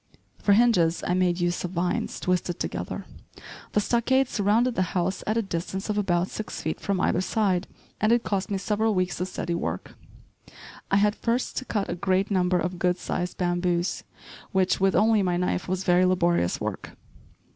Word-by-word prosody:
For 205 - +4
hinges 200 -7 +3
I 180 - +1
made 180 -1 +1
use 175 0 0
of 180 - -2
vines 175 +1 -1
twisted 180 -1 -1
together. - - -4 0.7
The - - +3
stockade 245 +5 +2
surrounded 225 +3 +2
the 185 -2 -1
house 180 +2 -1
at 215 +2 +1
a 230 - +1
distance 190 +2 -3
of 210 - -2
about 180 -2 +1
six 215 - -5
feet 160 - -3
from 200 -2 -1
either 180 - +2
side, 190 -2 0 0.3
and 215 +2 +2
it 240 0 +3
cost 200 0 -1
me 200 - 0
several 210 +2 0
weeks 185 -1 -1
of 180 - -1
steady 175 -2 -3
work. 170 - -4 1.0
I - - +2
had 205 +1 +4
first 235 +2 -1
to 260 - -2
cut 205 -5 -1
a - - -2
great 190 +2 0
number 180 -1 +2
of 180 +1 -2
good 180 0 +2
sized 180 0 -3
bamboos, 175 0 0 0.5
which, 190 -2 +2
with 190 0 +2
only 220 0 +4
my 180 -2 +1
knife, 180 0 -1
was 185 +1 -1
very 180 0 +4
laborious 175 - +2
work. - - -5
185 Hz, 185 wpm, -26 LUFS, 180-210 Hz, 1.0 s, For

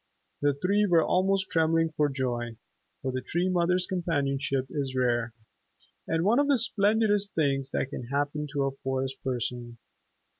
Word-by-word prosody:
The 145 -1 +2
three 200 +7 +1
were 170 -3 +4
almost 190 +1 +1
trembling 165 0 +2
for 150 -1 +1
joy, 120 -4 -3 0.5
for 130 - -1
the 130 0 -3
Tree 175 +7 -1
Mother's 180 0 +2
companionship 140 -6 -1
is 135 -3 -3
rare, 120 -2 +1 0.8
and 165 0 0
one 230 +6 +4
of 285 - +2
the 280 -2 +4
splendidest 210 -3 +2
things 135 -3 +1
that 135 - -2
can 120 - -6
happen 145 +2 -2
to 140 -1 0
a 135 - 0
Forest 135 0 -4
Person. 120 -2 -3
145 Hz, 155 wpm, -28 LUFS, 130-180 Hz, 0.8 s, were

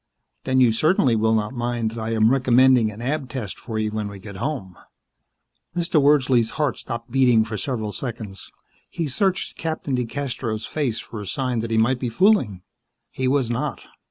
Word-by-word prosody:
Then 130 0 +2
you 125 -3 +6
certainly 135 0 +3
will 110 0 +2
not 105 +2 -1
mind 120 -2 -1
that 115 - -7
I 110 +1 -2
am 110 +1 +4
recommending 130 -3 +4
an 105 +2 -8
Ab 135 0 -2
Test 115 -6 -5
for 110 -2 -5
you 110 -1 -1
when 105 -1 -3
we 100 -1 -8
get 100 0 -10
home." 100 -8 -4 1.0
Mr. 170 -3 +2
Wordsley's 130 -5 +4
heart 150 -3 0
stopped 115 0 -6
beating 125 -4 +4
for 110 -1 -5
several 110 -2 -3
seconds. 110 -5 -6 0.4
He 165 - -3
searched 185 +7 -1
Captain 160 -4 -3
DeCastros' 125 -3 -3
face 130 -8 -1
for 110 - -7
a 100 - -7
sign 125 -1 -1
that 115 +1 -3
he 115 - +1
might 120 +3 +2
be 125 - -2
fooling. 115 - +2 0.5
He 130 - -2
was 130 -3 +1
not. 115 - -2
120 Hz, 185 wpm, -23 LUFS, 110-135 Hz, 1.0 s, you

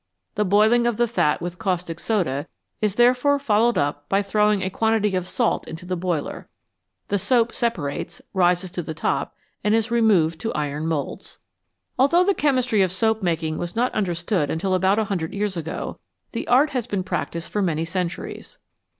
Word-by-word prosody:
The 210 - +1
boiling 215 +5 +4
of 235 -3 0
the 240 0 +2
fat 160 -11 +1
with 175 0 -5
caustic 175 -3 -2
soda 170 -10 -1 0.3
is 210 -2 +1
therefore 250 +4 +4
followed 235 -3 +2
up 145 0 -1
by 195 +1 +2
throwing 210 0 +2
a 190 - -2
quantity 220 -2 +1
of 185 -1 -2
salt 235 +3 0
into 165 +2 -8
the 185 0 -2
boiler; 170 -4 -3 0.6
the 205 - +1
soap 235 +3 +2
separates, 190 -13 -2
rises 180 -1 +2
to 175 - -3
the 160 -1 -6
top, - - -1 0.3
and 210 +1 +3
is 225 +1 0
removed 195 -9 +3
to 225 - -2
iron 150 +1 -2
moulds. 155 -3 -4 0.6
Although 335 +7 +5
the 400 +2 +3
chemistry 255 - +2
of 185 -2 +2
soap 220 +4 +1
making 160 -3 -1
was 175 0 -4
not 245 +2 +1
understood 175 -4 0
until 185 +4 -1
about 190 +2 +3
a 220 - +2
hundred 190 -6 -3
years 205 -1 -1
ago, 165 -1 -5 0.3
the - - -4
art 275 +5 +4
has 250 -4 -2
been 195 -2 -2
practised 170 -2 -4
for 210 - 0
many 165 -4 0
centuries. 175 0 -5
195 Hz, 180 wpm, -23 LUFS, 170-225 Hz, 0.6 s, Although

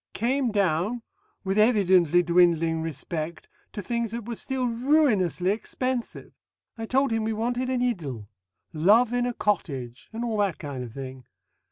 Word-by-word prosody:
Came 250 +2 0
down, 200 +4 0 0.4
with 195 +1 0
evidently 185 -6 +4
dwindling 170 -2 +3
respect, 160 +1 -5 0.2
to 205 - -6
things 235 +1 -2
that 230 0 -6
were 240 - -3
still 260 +2 -3
ruinously 230 - +2
expensive. 250 +3 -4 0.4
I 225 -1 -6
told 270 +1 +2
him 225 -1 0
we 220 0 -1
wanted 245 +3 -1
an 250 -1 0
idyll 145 - -3 0.5
love 215 +10 +4
in 245 0 +1
a 245 - -2
cottage, 135 - -2
and 230 +2 -4
all 225 -2 -2
that 200 -5 0
kind 140 -3 -6
of 120 - -8
thing. 130 -1 -8
210 Hz, 155 wpm, -26 LUFS, 165-240 Hz, 0.5 s, evidently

